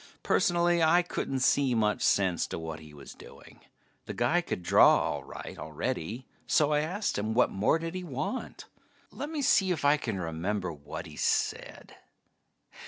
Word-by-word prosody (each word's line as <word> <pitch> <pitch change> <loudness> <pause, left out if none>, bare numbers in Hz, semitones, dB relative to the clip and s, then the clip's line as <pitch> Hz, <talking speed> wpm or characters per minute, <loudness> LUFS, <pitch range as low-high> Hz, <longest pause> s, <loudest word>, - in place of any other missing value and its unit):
Personally, 175 0 +2
I 165 +2 +4
couldn't 135 -6 -3
see 135 -1 +3
much 105 -2 +1
sense 95 -4 +2
to - - -5
what 80 -1 -6
he 75 -1 -13
was 70 -2 -12
doing. - - -15 0.5
The - - -5
guy 160 +9 +2
could 125 - -5
draw - - +6
all 75 -3 -2
right - - -9
already, 80 - -4 0.2
so 150 +4 +3
I 150 - +3
asked 180 - -2
him 110 +2 -2
what 125 - +3
more 100 +10 +2
did 165 +1 -5
he 185 0 -5
want? 150 - -5 0.5
Lemme 295 0 -4
see 195 -6 +3
if 165 -5 -1
I 145 +1 +5
can 110 -9 -4
remember 90 +2 -3
what 75 -1 -8
he - - -12
said. - - -2
125 Hz, 170 wpm, -29 LUFS, -, 0.5 s, draw